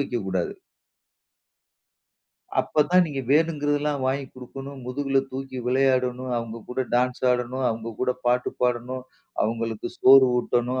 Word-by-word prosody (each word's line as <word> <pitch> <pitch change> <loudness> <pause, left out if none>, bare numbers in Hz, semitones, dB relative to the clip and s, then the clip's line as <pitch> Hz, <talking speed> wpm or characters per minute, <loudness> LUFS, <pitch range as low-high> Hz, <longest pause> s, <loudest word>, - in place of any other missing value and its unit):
வைக்கக்கூடாது. 95 -10 -2 2.1
அப்பத்தான் 175 +4 +3
நீங்க 140 -3 -3
வேணுங்கிறதெல்லாம் 145 -2 +1
வாங்கி 135 +1 0
குடுக்கணும். 135 +2 -9
முதுகில 135 +1 0
தூக்கி 130 0 -5
விளையாடணும். 130 -1 +1
அவங்க 115 -1 -4
கூட 125 +1 -3
டான்ஸ் 125 +1 +1
ஆடணும். 125 +1 -1
அவங்க 115 0 -4
கூட 125 0 +2
பாட்டு 125 +1 +2
பாடணும். 125 +1 -1 0.4
அவங்களுக்கு 115 0 -2
சோறு 135 0 +8
ஊட்டணும். 125 +1 0
130 Hz, 110 wpm, -25 LUFS, 125-135 Hz, 2.1 s, சோறு